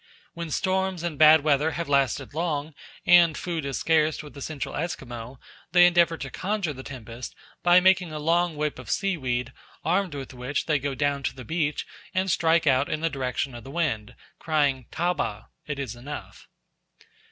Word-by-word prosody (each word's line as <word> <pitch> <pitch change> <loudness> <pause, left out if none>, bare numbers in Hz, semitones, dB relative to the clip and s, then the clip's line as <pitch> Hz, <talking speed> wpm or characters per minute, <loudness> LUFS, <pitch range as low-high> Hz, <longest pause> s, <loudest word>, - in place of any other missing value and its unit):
When 170 -1 -5
storms 190 +1 0
and 165 -4 -3
bad 155 0 +8
weather 150 +1 +2
have 170 -1 -3
lasted 140 -1 +1
long 155 -2 -2 0.3
and 170 -3 +6
food 165 -4 -3
is 135 -3 -2
scarce 155 -1 +2
with 150 - -11
the 140 - -10
Central 150 0 -4
Esquimaux, 125 -6 -5 0.4
they 175 0 +8
endeavour 170 -2 +4
to 135 -3 -6
conjure 190 -3 -2
the 130 - -9
tempest 120 -3 -8 0.3
by 175 +1 +6
making 185 -2 +3
a 155 - -5
long 165 +2 +1
whip 150 0 -2
of - - -10
seaweed, 130 - -1 0.3
armed 180 -1 +1
with 135 -1 -7
which 125 +3 -3
they 155 -2 +2
go 140 0 -3
down 140 +1 0
to - - -2
the 130 -3 -9
beach 150 0 -1 0.3
and 185 0 +1
strike 165 0 +3
out 135 -1 +3
in 155 - -2
the 165 0 0
direction 130 -1 -2
of 120 - -9
the 135 - -10
wind, 130 -8 -2 0.2
crying 145 -5 +1
"Taba 165 -11 -2 0.2
(it 140 -2 -3
is 130 -5 -4
enough)!" 140 +5 -9
150 Hz, 180 wpm, -26 LUFS, 135-170 Hz, 0.4 s, bad